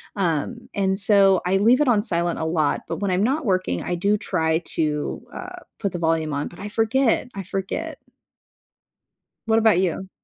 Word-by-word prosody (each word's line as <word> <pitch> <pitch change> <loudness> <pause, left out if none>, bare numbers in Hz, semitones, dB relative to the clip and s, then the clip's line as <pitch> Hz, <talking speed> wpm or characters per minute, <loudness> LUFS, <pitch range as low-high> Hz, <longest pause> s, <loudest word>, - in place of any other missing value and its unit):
Um, 195 +5 -2
and 195 -1 0
so, 195 -2 +4
I 190 +2 +2
leave 240 +8 +4
it 290 - +3
on 215 -4 +4
silent 170 -5 -1
a 160 - -2
lot. 160 -3 0
But - - -3
when 200 -2 0
I'm 185 +3 +1
not 275 +4 0
working, 185 - 0
I 175 - -2
do 200 +4 +1
try 160 -5 0 0.2
to, 150 +3 -1
uh, 365 -1 -7 0.2
put 200 -3 -1
the 175 - -5
volume 160 -2 0
on, 145 +1 -2
but 175 - -13
I 205 - -5
forget. 230 +3 +1
I 195 - -4
forget. 270 - -4 1.5
What 225 0 +4
about 220 -5 +4
you? 185 +1 -1
195 Hz, 190 wpm, -23 LUFS, 170-225 Hz, 1.5 s, so